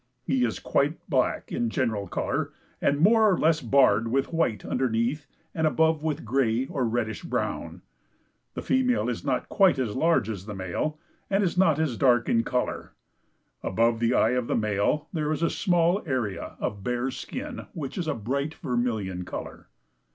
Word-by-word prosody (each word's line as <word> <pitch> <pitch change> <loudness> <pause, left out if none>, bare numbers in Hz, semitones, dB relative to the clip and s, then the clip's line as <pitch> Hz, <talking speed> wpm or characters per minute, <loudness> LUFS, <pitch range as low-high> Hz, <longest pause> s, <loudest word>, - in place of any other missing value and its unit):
He 130 -2 +1
is 115 - -2
quite 145 +3 -1
black 130 -3 0
in 120 - 0
general 110 -5 -1
color - - -2 0.3
and 140 - +2
more 215 +4 +5
or 180 - +2
less 160 0 +2
barred 115 -5 +4
with 135 +7 0
white 120 - 0
underneath 125 +4 -1 0.3
and 160 -1 +1
above 160 0 +2
with 155 -2 -2
gray 120 0 +1
or 135 -5 -2
reddish 110 -2 -2
brown. - - -3 0.7
The - - -4
female 255 -1 +2
is - - -4
not - - -1
quite 190 -7 +4
as 125 -5 -2
large 135 -5 +2
as 100 -3 -5
the 105 - -5
male, 95 - -3 0.3
and 195 +1 +2
is 180 -2 0
not 170 -5 +4
as 155 -7 -1
dark 120 -3 +3
in 115 0 +2
color. 125 +1 -2 0.7
Above 115 +3 +1
the 120 +1 +2
eye - - +4
of 125 -1 0
the - - 0
male 110 +8 0
there 155 -2 -1
is 155 +1 -1
a 165 - +2
small 175 +1 +2
area 120 - -2
of 100 -1 -3
bare 125 +1 -1
skin, - - -6
which 140 -4 -5
is 175 -4 -3
a 155 - 0
bright 140 +7 -2
vermilion 115 - -2
color. - - -7
130 Hz, 175 wpm, -26 LUFS, 115-160 Hz, 0.7 s, more